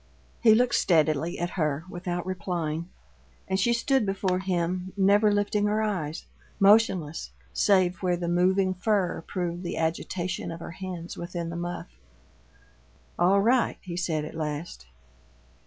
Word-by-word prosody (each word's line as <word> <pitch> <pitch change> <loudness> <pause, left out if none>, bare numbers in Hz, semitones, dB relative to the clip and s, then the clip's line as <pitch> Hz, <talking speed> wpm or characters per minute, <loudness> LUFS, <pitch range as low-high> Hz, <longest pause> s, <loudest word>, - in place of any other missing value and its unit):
He 220 -2 +7
looked 245 +1 +2
steadily 160 0 +2
at 175 +1 -2
her 155 -3 -1
without 175 -1 -4
replying, 170 -3 -3 0.6
and 190 0 0
she 235 +5 +3
stood 250 +2 +2
before 195 -2 0
him, 185 0 -2
never 205 +2 +4
lifting 205 0 +1
her 215 +1 +1
eyes; 170 -7 -3 0.3
motionless, 195 -6 +3 0.2
save 185 -3 +3
where 180 -2 +1
the 175 0 -3
moving 185 +2 +2
fur 185 -3 0
proved 175 -2 -3
the 175 - -4
agitation 170 +2 -2
of 165 - -7
her - - -7
hands 180 -1 -7
within 170 -1 -4
the - - -6
muff. 170 - -6 1.2
"All 190 +3 +4
right," 240 +3 +2
he 175 -2 -7
said 160 -4 -1
at - - -8
last. 150 - -5
180 Hz, 140 wpm, -27 LUFS, 170-195 Hz, 1.2 s, He